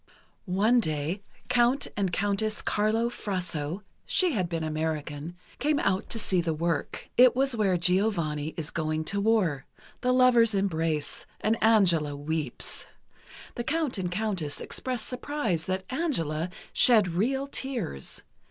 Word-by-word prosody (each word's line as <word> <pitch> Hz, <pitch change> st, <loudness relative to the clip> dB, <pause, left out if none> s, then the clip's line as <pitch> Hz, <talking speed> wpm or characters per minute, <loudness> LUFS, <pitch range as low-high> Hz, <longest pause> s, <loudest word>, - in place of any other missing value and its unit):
One 210 Hz, +7 st, +3 dB
day, 155 Hz, 0 st, -2 dB, 0.3 s
Count 250 Hz, +2 st, +2 dB
and 195 Hz, -3 st, 0 dB
Countess 205 Hz, +3 st, 0 dB
Carlo 215 Hz, +3 st, +1 dB
Frasso 180 Hz, -6 st, -3 dB, 0.2 s
(she 365 Hz, -2 st, +3 dB
had 185 Hz, -, -1 dB
been 165 Hz, -2 st, -2 dB
American) 155 Hz, 0 st, -3 dB, 0.2 s
came 295 Hz, +1 st, +2 dB
out 195 Hz, -6 st, 0 dB
to -, -, 0 dB
see 190 Hz, -5 st, +1 dB
the 165 Hz, -2 st, -1 dB
work. 165 Hz, -1 st, -2 dB
It 250 Hz, 0 st, +7 dB
was 265 Hz, -1 st, +1 dB
where 195 Hz, -5 st, +2 dB
Giovanni 170 Hz, -5 st, 0 dB
is 165 Hz, -1 st, -3 dB
going 155 Hz, -1 st, -1 dB
to 200 Hz, +5 st, -1 dB
war: 200 Hz, -10 st, +1 dB, 0.3 s
the 250 Hz, -, +2 dB
lovers 245 Hz, -4 st, +5 dB
embrace, 165 Hz, -6 st, -1 dB
and 220 Hz, +1 st, +1 dB
Angela 175 Hz, -10 st, +4 dB
weeps. 155 Hz, +2 st, -1 dB, 0.7 s
The 240 Hz, -, -4 dB
Count 305 Hz, -6 st, -1 dB
and 180 Hz, -2 st, -2 dB
Countess 180 Hz, -7 st, -2 dB
expressed 250 Hz, -4 st, -3 dB
surprise 250 Hz, -, -2 dB
that 185 Hz, 0 st, -2 dB
"Angela" 180 Hz, -, -1 dB, 0.2 s
shed 220 Hz, -7 st, +6 dB
real 265 Hz, +9 st, 0 dB
tears. 250 Hz, -, -3 dB
195 Hz, 135 wpm, -27 LUFS, 160-235 Hz, 0.7 s, It